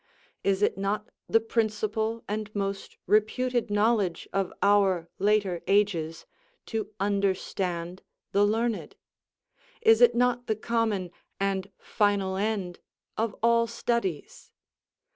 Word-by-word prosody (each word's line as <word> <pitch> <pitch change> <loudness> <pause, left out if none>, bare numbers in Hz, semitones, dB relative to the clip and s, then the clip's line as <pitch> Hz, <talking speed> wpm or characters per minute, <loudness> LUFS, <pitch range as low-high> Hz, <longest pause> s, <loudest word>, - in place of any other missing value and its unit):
Is 195 +1 +1
it 195 - +1
not 205 +2 -2 0.2
the 225 - +5
principal 220 0 -1
and 210 0 -3
most 195 -1 -3
reputed 240 +3 +1
knowledge 205 -4 +1
of 195 -2 0
our 195 -4 +3
later 200 -4 +2
ages 175 -6 +1 0.4
to 220 -3 -3
understand 190 -3 -1 0.3
the 200 - +3
learned? 225 +2 0 0.9
Is 225 +1 +6
it 240 -1 +6
not 245 0 +1
the 220 - +1
common 215 -5 -1 0.3
and 195 0 -1
final 200 -3 0
end 195 -3 -2 0.4
of 220 -2 -1
all 230 0 +4
studies? 230 -8 -3
205 Hz, 110 wpm, -27 LUFS, 195-225 Hz, 0.9 s, Is